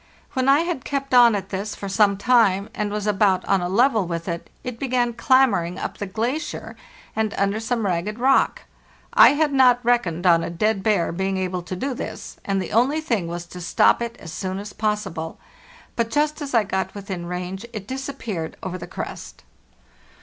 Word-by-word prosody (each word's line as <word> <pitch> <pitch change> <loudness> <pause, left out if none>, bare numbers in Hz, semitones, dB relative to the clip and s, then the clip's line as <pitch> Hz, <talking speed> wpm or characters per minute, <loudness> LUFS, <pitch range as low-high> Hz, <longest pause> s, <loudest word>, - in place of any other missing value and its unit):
When 260 +1 +1
I 280 +3 +6
had 340 -6 -3
kept 275 -1 -3
on 240 -3 +7
at 200 - -4
this 200 +2 -4
for 200 - -6
some 200 0 +3
time, 205 -3 +3
and 210 -1 -2
was 210 0 -3
about 195 -3 +2
on 195 -2 +2
a 175 - -2
level 220 -1 +3
with 170 0 -4
it, 170 -1 -4
it 250 -2 -6
began 245 -3 0
clambering 225 -9 +3
up - - -5
the 205 - -3
glacier 240 - -3 0.4
and 220 -1 -1
under 200 +2 +1
some 225 0 -1
ragged 190 +3 -1
rock. 265 +3 +2 0.5
I - - +8
had 295 -1 +1
not 255 -2 +5
reckoned 190 -8 +1
on 170 -2 +5
a - - -3
'dead_ 200 +4 0
bear' 195 -5 +1
being 190 +2 -1
able 185 -1 -2
to 180 +2 -6
do 265 +9 -2
this, - - -7
and 195 -1 0
the 185 - -4
only 260 +8 +3
thing 230 - -1
was 170 +1 -5
to 180 +1 -10
stop 175 - +3
it 235 0 -4
as 160 - -9
soon 190 -1 -3
as 200 0 -7
possible; 210 -7 -3 0.6
but 230 -1 0
just 300 +3 0
as 280 -3 -3
I 225 - +5
got 190 0 -3
within 190 -4 -6
range 180 +3 -5
it 210 -3 -6
disappeared 260 - -5
over 185 -1 -4
the 175 - -8
crest. - - -7
210 Hz, 195 wpm, -23 LUFS, 185-245 Hz, 0.6 s, I